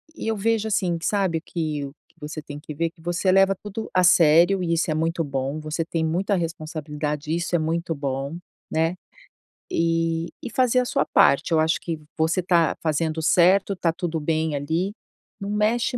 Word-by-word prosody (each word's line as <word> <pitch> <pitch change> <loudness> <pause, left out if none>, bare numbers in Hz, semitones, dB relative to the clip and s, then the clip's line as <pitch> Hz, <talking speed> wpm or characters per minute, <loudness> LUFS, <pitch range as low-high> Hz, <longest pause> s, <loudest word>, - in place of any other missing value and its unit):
e - - -6
eu 225 -1 0
vejo 220 +1 +1
assim, 185 -5 0
que 165 - -6
sabe 190 -6 +1
que 155 -4 -3
o 135 - -8 0.2
que - - -32
você 150 +1 -6
tem 145 -1 -9
que 150 - -8
ver, 165 +2 0
que 165 -1 -22
você 175 +3 0
leva 195 0 +4
tudo 210 +3 -7
a 185 -1 +3
sério, 170 +3 +5
e 170 -1 0
isso 165 -1 +1
é 155 - 0
muito 165 +1 0
bom. 135 +1 -3
Você 155 +2 -2
tem 165 -1 -1
muita 185 +6 0
responsabilidade, 155 -3 -4
e - - +2
isso 175 +1 -1
é - - +3
muito 165 +1 -1
bom, 140 +2 -3 0.3
né. 165 +3 +1 0.8
E 165 0 0
e 250 - -4
fazer 255 +1 +3
a 250 - +1
sua - - 0
parte. 140 +4 +3
Eu 160 - +4
acho 160 +1 +2
que 165 -2 -4 0.2
você 160 +3 +1
está 170 -3 +2
fazendo 160 0 -1
certo, 185 +4 +4
está 170 -3 0
tudo 165 -1 -3
bem 155 0 0
ali. 160 +7 -1 0.5
Não 200 -1 -5
mexe 220 +4 +1
165 Hz, 200 wpm, -24 LUFS, 155-185 Hz, 0.8 s, sério